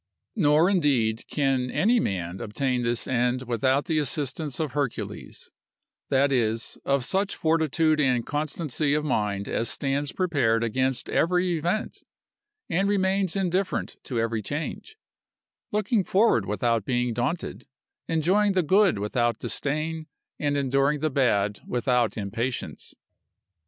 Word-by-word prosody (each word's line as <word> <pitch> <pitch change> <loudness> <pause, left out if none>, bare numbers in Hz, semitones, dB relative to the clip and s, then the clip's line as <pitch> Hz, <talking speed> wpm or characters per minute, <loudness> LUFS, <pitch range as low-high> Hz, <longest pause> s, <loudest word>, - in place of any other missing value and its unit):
Nor 155 -3 +4
indeed 135 - +1
can 135 -3 0
any 230 - +2
man 95 - -3
obtain 125 +3 -1
this 120 0 0
end 125 0 0
without 130 +3 +1
the 160 -3 +1
assistance 145 0 -2
of 155 -4 -1
Hercules; 140 -3 -4 0.6
that 140 +1 +3
is, 115 -3 0
of 140 -2 +1
such 195 +4 -1
fortitude 160 -1 +2
and 125 -4 +2
constancy 150 -1 -1
of 150 0 -1
mind 105 -7 -1
as 115 - -1
stands 140 0 -1
prepared 135 -11 +1
against 130 +3 0
every 180 +1 +1
event, 175 +7 -2 0.7
and 195 +4 +1
remains 190 -2 +1
indifferent 190 0 -1
to 120 -4 -2
every 115 -1 -1
change; 155 - -5 0.7
looking 210 0 +1
forward 190 - +2
without 115 +2 0
being 125 +1 0
daunted, 120 - -3 0.4
enjoying 190 +6 +2
the 185 -2 +2
good 190 - +4
without 115 +3 0
disdain, 155 +4 -2 0.3
and 145 -1 0
enduring 140 +1 +1
the 155 -1 0
bad 105 -6 +1
without 125 -2 +1
impatience. 115 +5 -4
140 Hz, 125 wpm, -26 LUFS, 120-165 Hz, 0.7 s, Nor